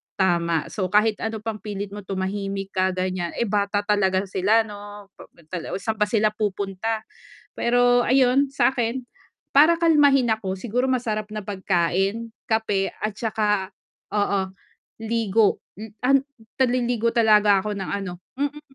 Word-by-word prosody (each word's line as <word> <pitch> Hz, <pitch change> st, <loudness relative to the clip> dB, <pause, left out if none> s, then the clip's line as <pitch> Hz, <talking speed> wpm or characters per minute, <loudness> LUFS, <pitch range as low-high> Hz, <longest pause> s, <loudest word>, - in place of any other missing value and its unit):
tama, 170 Hz, -4 st, +1 dB
so 190 Hz, -3 st, -2 dB
kahit 210 Hz, +2 st, +2 dB
ano 220 Hz, -1 st, -4 dB
pang 220 Hz, -2 st, -4 dB
pilit 200 Hz, 0 st, -5 dB
mo 205 Hz, -, -7 dB
tumahimik 195 Hz, 0 st, -4 dB
ka 185 Hz, 0 st, 0 dB
ganiyan, 185 Hz, -2 st, -2 dB
eh, -, -, 0 dB
bata 205 Hz, 0 st, 0 dB
talaga 195 Hz, -2 st, +2 dB
sila 205 Hz, +4 st, +2 dB
'no, 205 Hz, -1 st, -10 dB
pa -, -, -13 dB, 0.2 s
tala 175 Hz, -3 st, -4 dB
saan 220 Hz, +2 st, -3 dB
ba 210 Hz, -, +3 dB
sila 215 Hz, -1 st, +2 dB
pupunta. 210 Hz, +1 st, -2 dB, 0.5 s
Pero 245 Hz, +1 st, +3 dB
ayun 265 Hz, +1 st, +3 dB
sa'kin 250 Hz, -2 st, 0 dB, 0.5 s
para 310 Hz, +4 st, +7 dB
kalmahin 285 Hz, -7 st, +4 dB
ako 195 Hz, -4 st, -1 dB
siguro 245 Hz, +6 st, -1 dB
masarap 225 Hz, -5 st, -1 dB
na 210 Hz, -, -4 dB
pagkain, 195 Hz, +3 st, -1 dB, 0.2 s
kape 210 Hz, -3 st, 0 dB
at 215 Hz, -, 0 dB
saka 210 Hz, -4 st, 0 dB, 0.4 s
oo, 200 Hz, -2 st, 0 dB, 0.5 s
ligo. 225 Hz, -2 st, +2 dB, 0.2 s
Mm, 220 Hz, -1 st, -8 dB
an 275 Hz, +2 st, +5 dB, 0.5 s
naliligo 240 Hz, -2 st, +1 dB
talaga 210 Hz, -3 st, +5 dB
ako 210 Hz, -1 st, -3 dB
ng 195 Hz, -2 st, -5 dB
ano 180 Hz, -3 st, -6 dB, 0.2 s
mm, 290 Hz, +1 st, -2 dB
210 Hz, 140 wpm, -23 LUFS, 195-230 Hz, 0.5 s, para